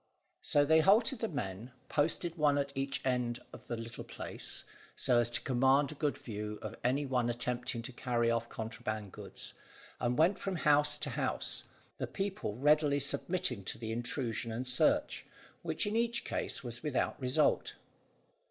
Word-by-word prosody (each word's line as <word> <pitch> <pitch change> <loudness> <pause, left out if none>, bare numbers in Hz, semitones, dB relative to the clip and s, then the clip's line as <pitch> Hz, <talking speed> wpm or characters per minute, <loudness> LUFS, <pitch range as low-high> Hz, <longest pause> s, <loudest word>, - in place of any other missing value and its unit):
So 145 0 +3
they 160 +2 +6
halted 220 - +5
the 225 - 0
men, 120 - -5
posted 165 +3 0
one 150 -3 +3
at 140 0 0
each 135 0 -2
end 125 -2 0
of - - -11
the 120 - -3
little 115 0 -7
place, - - -3 0.3
so 120 - +4
as 120 0 +3
to 120 - +1
command 135 +2 +3
a - - -5
good 145 -1 -1
view 105 -2 -5
of 110 +1 -5
any 135 +4 +2
one 125 -3 +1
attempting 120 0 -1
to 130 - -6
carry 120 -1 +1
off 115 0 -1
contraband 110 -2 -4
goods, - - -7 0.5
and 120 0 0
went 170 +6 +4
from 195 -1 -2
house 150 -2 +4
to - - -3
house, - - -1 0.3
the - - -1
people 195 - -3
readily 145 +2 +4
submitting 140 - -1
to - - -4
the 110 -1 -4
intrusion 120 -1 -2
and 120 +3 -3
search, 125 0 +2 0.3
which - - 0
in 205 +1 -1
each 235 0 +1
case - - -2
was 120 -1 -6
without 150 0 -1
result. 130 +4 +2
130 Hz, 170 wpm, -33 LUFS, 120-150 Hz, 0.5 s, they